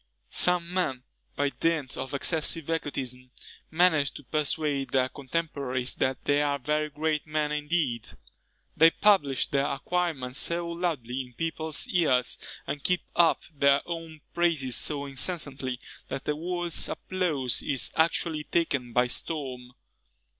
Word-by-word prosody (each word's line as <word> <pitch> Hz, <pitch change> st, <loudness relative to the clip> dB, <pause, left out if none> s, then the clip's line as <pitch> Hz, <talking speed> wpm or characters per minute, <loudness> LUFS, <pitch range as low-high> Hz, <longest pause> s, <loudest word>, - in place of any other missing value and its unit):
Some 180 Hz, -1 st, +2 dB
men, 135 Hz, -9 st, 0 dB, 0.3 s
by 145 Hz, 0 st, +1 dB
dint 160 Hz, -5 st, -1 dB
of 130 Hz, +2 st, -4 dB
excessive 160 Hz, +1 st, +1 dB
egotism, 130 Hz, -5 st, -3 dB, 0.4 s
manage 160 Hz, -4 st, +3 dB
to 145 Hz, -, -9 dB
persuade 145 Hz, 0 st, 0 dB
their 130 Hz, -1 st, +2 dB
contemporaries 135 Hz, -3 st, -2 dB
that 130 Hz, 0 st, -1 dB
they 145 Hz, 0 st, +3 dB
are 145 Hz, -1 st, +1 dB
very 150 Hz, +3 st, 0 dB
great 150 Hz, 0 st, -1 dB
men 150 Hz, -1 st, 0 dB
indeed: 150 Hz, -6 st, -1 dB, 0.7 s
they 165 Hz, +1 st, +8 dB
publish 165 Hz, -9 st, +3 dB
their 140 Hz, 0 st, +1 dB
acquirements 140 Hz, -3 st, -1 dB
so 170 Hz, 0 st, +1 dB
loudly 150 Hz, -8 st, -2 dB
in 125 Hz, -1 st, -11 dB
people's 160 Hz, 0 st, -1 dB
ears, 140 Hz, -8 st, +2 dB, 0.3 s
and 140 Hz, 0 st, -4 dB
keep 180 Hz, -1 st, +2 dB
up 170 Hz, -1 st, +4 dB
their 140 Hz, -1 st, +4 dB
own 165 Hz, -2 st, -6 dB
praises 160 Hz, -7 st, +2 dB
so 145 Hz, -2 st, 0 dB
incessantly, 135 Hz, -2 st, -2 dB, 0.3 s
that 135 Hz, 0 st, -5 dB
the 150 Hz, -, 0 dB
world's 175 Hz, +1 st, -1 dB
applause 160 Hz, -10 st, -1 dB
is 135 Hz, -4 st, 0 dB
actually 160 Hz, -1 st, +1 dB
taken 140 Hz, -8 st, 0 dB
by 125 Hz, +1 st, +4 dB
storm. 125 Hz, -2 st, -3 dB
150 Hz, 130 wpm, -28 LUFS, 135-165 Hz, 0.7 s, they